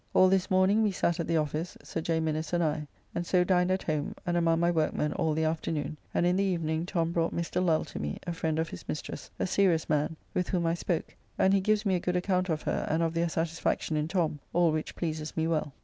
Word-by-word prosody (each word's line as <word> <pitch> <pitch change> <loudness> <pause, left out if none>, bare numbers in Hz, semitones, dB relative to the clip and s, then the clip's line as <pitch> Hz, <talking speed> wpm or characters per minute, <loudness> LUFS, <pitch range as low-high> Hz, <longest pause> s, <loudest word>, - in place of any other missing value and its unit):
All 185 - +7
this 190 0 +2
morning 190 +3 +4
we 215 - +3
sat 170 -2 0
at 170 - -1
the 165 - +2
office, 155 +3 -2
Sir 165 - -4
J. 165 0 0
Minnes 160 0 -2
and 175 0 +2
I. 150 -1 -1 0.3
And 170 - -1
so 180 +1 +3
dined 180 0 +2
at 185 0 0
home, 155 -2 -2
and 175 0 0
among 165 -1 +3
my 170 +1 +3
workmen 155 -2 0
all 155 -1 0
the 160 - +1
afternoon, 155 -2 -1 0.2
and - - +1
in 180 +1 +3
the 200 - +2
evening 165 -3 -1
Tom 170 -3 0
brought 165 -1 0
Mr. 170 +2 -1
Lull 160 -3 +2
to - - -7
me, 75 0 -3
a 175 - -2
friend 160 -1 -1
of 160 0 0
his - - -9
mistress, 150 - -5
a - - 0
serious 185 -3 +2
man, 150 +1 +1 0.2
with 180 - -1
whom 175 -3 0
I 165 - +2
spoke, 170 -1 -2 0.2
and 190 - +4
he 195 - +4
gives 215 +2 +1
me 195 - +2
a 180 - +2
good 180 +1 -1
account 185 0 +1
of 155 -1 -1
her - - -1
and 160 +2 +2
of 165 -1 0
their 170 0 +1
satisfaction 165 -1 -1
in 150 0 0
Tom, 165 -4 0
all 170 -1 +4
which 155 0 -3
pleases 155 -2 -4
me 160 - +2
well. 155 -3 0
165 Hz, 255 wpm, -29 LUFS, 160-180 Hz, 0.3 s, All